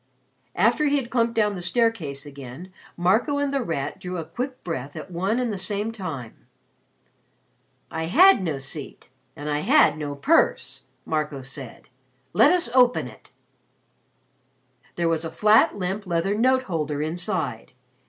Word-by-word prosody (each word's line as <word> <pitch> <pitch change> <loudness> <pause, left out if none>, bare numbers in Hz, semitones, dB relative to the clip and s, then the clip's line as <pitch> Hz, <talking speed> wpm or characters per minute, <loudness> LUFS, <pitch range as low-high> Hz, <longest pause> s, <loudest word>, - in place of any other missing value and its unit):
After 300 - +3
he 285 - +2
had 260 -4 -2
clumped 235 -2 +1
down 210 -2 +2
the 180 - -6
staircase 175 - 0
again, 140 +5 -10 0.2
Marco 205 - +2
and 285 -1 -1
The 275 - +1
Rat 150 - -3
drew 180 0 -5
a 165 - -4
quick 255 - -5
breath 145 -5 -5
at 160 +4 -8
one 190 +6 -1
and 245 -3 -1
the 195 - -5
same 205 +4 -2
time. 160 - -8 1.4
"I 160 - -3
had 335 - +6
no 160 -6 -2
seat 135 0 -7 0.3
and 145 - -7
I 150 0 0
had 155 - +4
no 145 -1 -4
purse," 315 - +1 0.2
Marco 150 -3 -2
said. 135 -2 -7 0.5
"Let 295 - +6
us 345 -10 +2
open 250 -1 +4
it." - - -15 1.7
There 170 -1 0
was 165 -1 0
a 165 - -4
flat 210 +5 +4
limp 190 +2 -3
leather 170 +3 0
note 260 +4 +2
holder 150 - -2
inside. 160 - -3
180 Hz, 155 wpm, -24 LUFS, 150-230 Hz, 1.7 s, had